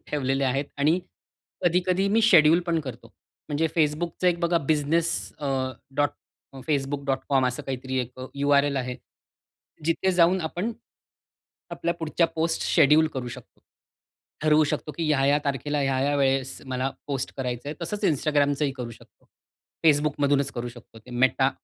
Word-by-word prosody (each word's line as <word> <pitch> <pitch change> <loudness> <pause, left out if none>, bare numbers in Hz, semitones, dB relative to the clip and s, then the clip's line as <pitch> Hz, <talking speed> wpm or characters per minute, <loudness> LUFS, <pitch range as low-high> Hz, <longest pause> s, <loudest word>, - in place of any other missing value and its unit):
ठेवलेले 135 -1 0
आहेत 135 +2 0
आणि 155 +5 +3 0.7
कधी-कधी 180 +2 +2
मी 220 +3 +3
शेड्यूल 170 -5 +6
पण 165 -1 +1
करतो. 120 -5 -9 0.4
म्हणजे 155 +2 +1
Facebookच 160 +3 0
एक 175 -1 +3
बघा 170 0 +2
बिझनेस 155 +2 +1 0.3
अ, 145 - -4 0.5
डॉट 145 0 +2 0.6
facebook.com 140 -2 0
असं 125 +4 -3
काहीतरी 130 0 -4
एक 125 +1 -5
यु-आर-एल 140 0 +2
आहे, 125 -1 -2 0.9
जिथे 165 +3 +1
जाऊन 180 +1 +4
आपण 175 +8 -3 1.0
आपल्या 170 0 -2
पुढच्या 165 0 0
पोस्ट 165 0 -1
शेड्यूल 150 +3 +5
करू 125 -2 -3
शकतो. - - -12 0.8
ठरवू 155 0 +5
शकतो, 150 +1 -3
की 165 - -2
ह्या-ह्या 140 -1 +3
तारखेला 145 +1 -1
ह्या-ह्या 135 +1 +1
वेळेस 135 -1 0
मला 130 +1 -2 0.2
पोस्ट 135 -2 -3
करायचंय. 130 +3 -4
तसंच 205 +5 -4
Instagramचही 145 -2 +2
करू 120 -3 -5
शकतो. - - -18 0.6
Facebookमधूनच 145 -2 +2
करू 120 0 -4
शकतो 120 -1 -14
ते 125 +3 -16
मेटा 130 +2 +2
145 Hz, 135 wpm, -25 LUFS, 135-160 Hz, 1.0 s, शेड्यूल